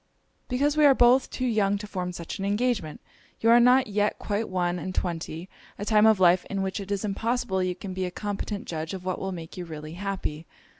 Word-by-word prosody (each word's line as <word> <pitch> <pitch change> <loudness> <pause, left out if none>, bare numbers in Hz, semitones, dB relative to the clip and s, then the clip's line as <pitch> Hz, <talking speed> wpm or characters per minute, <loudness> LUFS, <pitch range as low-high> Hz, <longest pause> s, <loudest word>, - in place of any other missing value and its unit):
'Because 285 +4 +1
we 305 - +3
are 280 -2 +7
both 250 +2 +5
too 255 - -3
young 205 -4 +2
to 205 - -7
form 180 -3 -4
such 170 0 -7
an - - -3
engagement. 205 -5 -1 0.4
You 230 - +4
are 240 - +8
not 250 +2 +5
yet 205 0 0
quite 210 +2 -2
one 180 -1 -1
and 185 +1 -5
twenty; 170 0 -3 0.3
a 205 - -5
time 215 0 +5
of 220 -3 +4
life 180 0 +5
in 195 -1 -2
which 190 0 -3
it 200 -1 -7
is 200 +1 -1
impossible 220 -1 -1
you 180 -1 -1
can 185 +1 -7
be 185 0 -2
a - - -2
competent 205 +2 -4
judge 160 +2 -4
of 185 -1 -9
what 185 -1 -2
will 190 - -3
make 165 -2 -8
you 180 - -4
really 155 -1 -8
happy. 180 -4 -4
195 Hz, 230 wpm, -26 LUFS, 180-220 Hz, 0.4 s, are